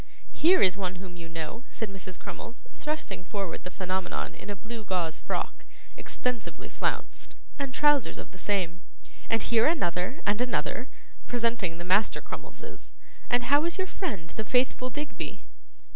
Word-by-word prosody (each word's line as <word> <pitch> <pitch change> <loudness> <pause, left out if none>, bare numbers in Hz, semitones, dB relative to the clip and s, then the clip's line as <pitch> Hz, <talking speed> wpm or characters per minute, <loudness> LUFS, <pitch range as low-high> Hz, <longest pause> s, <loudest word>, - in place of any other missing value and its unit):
'Here 355 +4 +6
is 185 0 +5
one 190 -2 -1
whom 180 -1 -8
you 165 -1 -8
know,' 165 +8 -4
said 220 -4 -3
Mrs. 185 -1 -6
Crummles, 235 - -7
thrusting 305 -10 -2
forward 195 -2 -3
the 180 - -4
Phenomenon 185 0 -2
in - - -9
a 205 - -1
blue 220 +4 -6
gauze 180 -5 0
frock, - - -2 0.3
extensively 250 -3 -3
flounced, - - -2 0.2
and 275 -2 -1
trousers 295 -1 +4
of - - -7
the 185 - -12
same; 185 -3 +1 0.5
'and 225 - +4
here 230 +1 +5
another 195 - +1
and 205 +3 +3
another,' 250 +1 0 0.4
presenting 230 -8 +1
the 175 - -5
Master 190 +4 +4
Crummleses. - - -8 0.4
'And 245 0 +4
how 285 +4 +5
is 340 +2 +1
your 380 - +1
friend, 210 - -3
the 220 - -3
faithful 250 +2 +3
Digby? 295 +2 -4
210 Hz, 160 wpm, -29 LUFS, 185-255 Hz, 0.5 s, Here